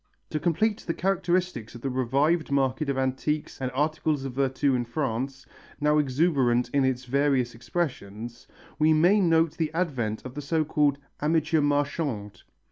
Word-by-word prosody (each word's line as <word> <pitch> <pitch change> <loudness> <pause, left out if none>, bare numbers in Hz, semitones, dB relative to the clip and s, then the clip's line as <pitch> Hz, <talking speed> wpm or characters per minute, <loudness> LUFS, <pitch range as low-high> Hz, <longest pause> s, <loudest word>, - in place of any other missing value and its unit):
To 155 - -1
complete 205 +7 +1
the 165 - -4
characteristics 180 - -1
of 120 - -9
the 135 - -2
revived 140 +6 +1
market 140 +1 +1
of 140 - 0
antiques 135 +3 -2
and 130 - -1
articles 150 0 0
of 135 - -4
virtu 135 +1 +1
in 125 -1 +1
France, 130 +1 -3 0.3
now 150 +1 +3
exuberant 135 -4 +2
in 140 -1 +3
its 130 -1 0
various 135 -2 +1
expressions, 120 - -4 0.3
we 155 +1 +5
may 175 +7 +5
note 165 -2 +3
the 160 -2 -1
advent 130 -12 -1
of 130 - -7
the 145 - -5
so 155 +2 0
called 145 -2 +2 0.2
amateur 155 +1 +2
marchand. 145 - -1
140 Hz, 155 wpm, -26 LUFS, 130-160 Hz, 0.3 s, we